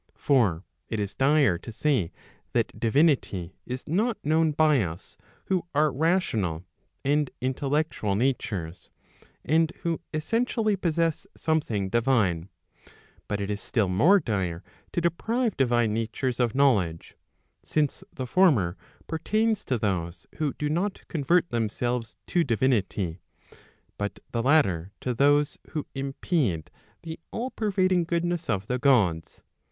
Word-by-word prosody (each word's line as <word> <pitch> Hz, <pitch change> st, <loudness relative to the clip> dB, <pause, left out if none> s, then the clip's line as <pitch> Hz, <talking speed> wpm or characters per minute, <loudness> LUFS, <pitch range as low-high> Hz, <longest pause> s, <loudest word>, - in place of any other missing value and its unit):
For 105 Hz, -, +2 dB, 0.3 s
it 110 Hz, -, -2 dB
is 100 Hz, -1 st, -2 dB
dire 135 Hz, -, +3 dB
to 115 Hz, -, -9 dB
say 120 Hz, -, 0 dB, 0.4 s
that -, -, 0 dB
divinity 115 Hz, -, +2 dB
is 125 Hz, +1 st, -5 dB
not 215 Hz, +9 st, +1 dB
known 160 Hz, +1 st, +3 dB
by 150 Hz, -3 st, +4 dB
us 85 Hz, -2 st, -6 dB, 0.3 s
who 185 Hz, -3 st, -1 dB
are 150 Hz, 0 st, +4 dB
rational 120 Hz, -, 0 dB, 0.4 s
and 145 Hz, 0 st, +2 dB
intellectual 135 Hz, -4 st, -1 dB
natures, 105 Hz, -8 st, -2 dB, 0.6 s
and 160 Hz, +2 st, +3 dB
who 170 Hz, -1 st, -1 dB
essentially 215 Hz, +6 st, 0 dB
possess 165 Hz, -3 st, 0 dB
something 115 Hz, -12 st, 0 dB
divine; 105 Hz, -8 st, +1 dB, 0.8 s
but 105 Hz, -, -2 dB
it 100 Hz, 0 st, -2 dB
is 105 Hz, 0 st, -3 dB
still 110 Hz, -5 st, 0 dB
more 165 Hz, -, +5 dB
dire 95 Hz, -, -2 dB, 0.3 s
to 175 Hz, -, -1 dB
deprive 220 Hz, +8 st, 0 dB
divine 120 Hz, -4 st, +2 dB
natures 115 Hz, +3 st, -2 dB
of 120 Hz, -2 st, +1 dB
knowledge; 100 Hz, -13 st, +2 dB, 0.5 s
since 150 Hz, -2 st, -1 dB
the 130 Hz, -, -5 dB
former 125 Hz, -, +3 dB, 0.3 s
pertains 215 Hz, +6 st, 0 dB
to 130 Hz, -, 0 dB
those 90 Hz, -5 st, -2 dB
who 150 Hz, -3 st, 0 dB
do 150 Hz, -, -2 dB
not 180 Hz, +7 st, -2 dB
convert 170 Hz, +2 st, +2 dB
them¬ 115 Hz, -2 st, 0 dB
selves 120 Hz, +1 st, -3 dB
to 175 Hz, -, +2 dB
divinity, 110 Hz, -, 0 dB, 0.8 s
but 105 Hz, 0 st, -3 dB
the 115 Hz, -, 0 dB
latter 100 Hz, -, +2 dB
to 125 Hz, -, -2 dB
those 145 Hz, +3 st, +3 dB
who 155 Hz, -2 st, -2 dB
impede 135 Hz, -, -1 dB, 0.3 s
the 160 Hz, -1 st, -7 dB
all 250 Hz, +3 st, -4 dB
pervading 185 Hz, -4 st, +1 dB
goodness 170 Hz, 0 st, -1 dB
of 100 Hz, 0 st, 0 dB
the 125 Hz, +3 st, -2 dB
Gods. 100 Hz, -, +2 dB
135 Hz, 130 wpm, -26 LUFS, 105-160 Hz, 0.8 s, more